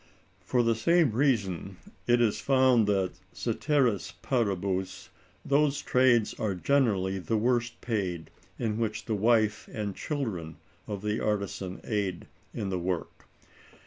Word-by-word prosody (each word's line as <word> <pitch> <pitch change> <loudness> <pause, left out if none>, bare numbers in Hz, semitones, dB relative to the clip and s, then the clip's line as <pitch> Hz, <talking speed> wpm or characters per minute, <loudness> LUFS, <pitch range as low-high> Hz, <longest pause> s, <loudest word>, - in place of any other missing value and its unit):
For 125 -1 +1
the 115 0 +3
same 165 +6 +3
reason 100 - 0 0.3
it 120 0 +4
is 115 -3 +1
found 130 -5 +4
that, 95 -3 +1 0.2
cæteris 120 -5 0
paribus, 100 -6 -1 0.4
those 145 0 +2
trades 125 -5 +3
are 105 -3 -1
generally 95 -5 +1
the 110 +5 -1
worst 120 +1 0
paid 95 -8 -3 0.3
in 110 -2 -2
which 110 -2 -2
the 110 - -2
wife 110 0 +2
and 105 -3 -4
children 100 - -4 0.3
of 100 -1 -5
the 105 +1 -1
artisan 100 -3 -2
aid 100 -5 -2 0.3
in 100 - -4
the 95 -1 -1
work. 90 -1 -4
110 Hz, 130 wpm, -28 LUFS, 95-120 Hz, 0.4 s, it